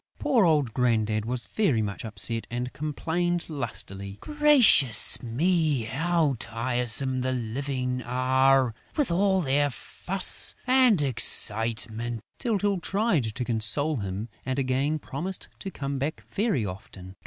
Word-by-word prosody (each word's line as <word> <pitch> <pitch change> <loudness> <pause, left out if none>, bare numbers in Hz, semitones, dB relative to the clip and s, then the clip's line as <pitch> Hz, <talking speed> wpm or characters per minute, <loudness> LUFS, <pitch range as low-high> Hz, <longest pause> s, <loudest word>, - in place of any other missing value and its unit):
Poor 250 -9 +1
old 150 -8 0
Grandad 110 -4 -1
was 120 +1 -1
very 145 - -1
much 100 -1 -6
upset 110 +1 +2
and 125 +1 -5
complained 170 +4 -3
lustily: 100 -7 -7
"Gracious 275 - +5
me, 150 +2 -1
how 155 +4 -1
tiresome 125 +3 -1
the 130 +1 -2
Living 125 +1 -4
are, 130 0 +1 0.2
with 295 - -1
all 190 +2 +1
their 145 -1 0
fuss 185 +8 +4
and 250 - +3
excitement!" 115 -2 +1 0.2
Tyltyl 205 -5 -1
tried 195 - -1
to 115 +3 -5
console 125 +7 -1
him 100 +1 -6 0.2
and 130 0 -4
again 135 +3 -1
promised 170 +6 -7
to 195 - -7
come 140 -5 -6
back 150 +4 -5
very 200 - -1
often. 95 -1 -11
130 Hz, 125 wpm, -25 LUFS, 115-170 Hz, 0.2 s, Gracious